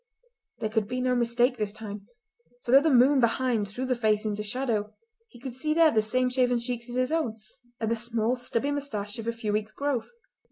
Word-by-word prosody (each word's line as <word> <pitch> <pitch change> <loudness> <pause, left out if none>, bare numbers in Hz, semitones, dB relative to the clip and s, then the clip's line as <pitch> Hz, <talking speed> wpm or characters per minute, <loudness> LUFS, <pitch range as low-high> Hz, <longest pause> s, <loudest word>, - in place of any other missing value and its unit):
There 215 - -2
could 215 -2 0
be 250 +2 -3
no 255 0 +1
mistake 240 +1 +2
this 210 -1 -1
time, 205 -1 -8 0.6
for 240 - -3
though 270 +2 +8
the 320 - +2
moon 265 +1 +5
behind 235 -2 +1
threw 245 +6 -4
the 255 - +1
face 220 -3 +1
into 210 -1 -2
shadow 215 -1 -2 0.3
he 240 - -16
could 260 0 -6
see 305 +5 -1
there 325 -1 +6
the 220 - +3
same 255 +4 +1
shaven 250 -1 +2
cheeks 240 0 -3
as 240 - -6
his 255 +2 0
own, 310 -9 -1 0.4
and 225 0 -1
the - - +2
small 230 +1 0
stubby 245 +2 -2
moustache 230 -7 -3
of 225 - -6
a - - +2
few 230 -2 -3
weeks' 215 +1 -2
growth. 280 -4 -2
240 Hz, 215 wpm, -27 LUFS, 215-255 Hz, 0.6 s, though